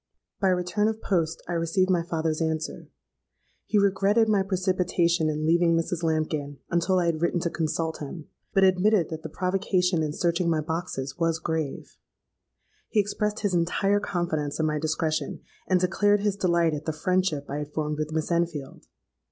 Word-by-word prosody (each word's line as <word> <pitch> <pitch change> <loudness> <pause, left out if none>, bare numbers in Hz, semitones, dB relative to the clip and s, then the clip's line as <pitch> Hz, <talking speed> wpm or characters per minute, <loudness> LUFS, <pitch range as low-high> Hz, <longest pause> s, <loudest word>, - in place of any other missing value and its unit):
By 195 - +2
return 185 +3 +1
of 220 0 -2
post 165 -6 -1
I 175 - -3
received 170 +3 +1
my 175 -2 +3
father's 160 -1 -2
answer. 160 -1 -3 0.8
He 210 - +2
regretted 200 +3 +3
my 210 -2 +3
precipitation 180 -3 +1
in 155 0 -2
leaving 170 +1 +3
Mrs. 165 +1 -2
Lambkin 155 -3 -1
until 175 +2 +2
I 180 - +2
had 165 -2 0
written 170 +1 +1
to 170 - -1
consult 160 0 -2
him; 150 +2 -7 0.2
but 195 - +3
admitted 190 0 +3
that 160 0 -5
the 160 - -6
provocation 180 0 0
in 155 -1 -1
searching 170 +2 0
my 160 -2 +2
boxes 160 -3 -4
was 165 -1 +1
grave. 160 -3 -4 0.9
He 220 - +2
expressed 210 +1 -1
his 205 -3 0
entire 185 +4 +2
confidence 160 -7 -2
in 160 - +2
my 150 -1 0
discretion, 155 -1 -1 0.3
and 185 -1 +3
declared 205 +3 +2
his 205 -1 +1
delight 170 -4 +2
at 150 0 -5
the 160 - -1
friendship 175 -2 0
I 145 - -4
had 150 0 -6
formed 150 0 -2
with 155 0 -2
Miss 160 +1 -2
Enfield. 165 -5 -2
170 Hz, 175 wpm, -26 LUFS, 155-185 Hz, 0.9 s, my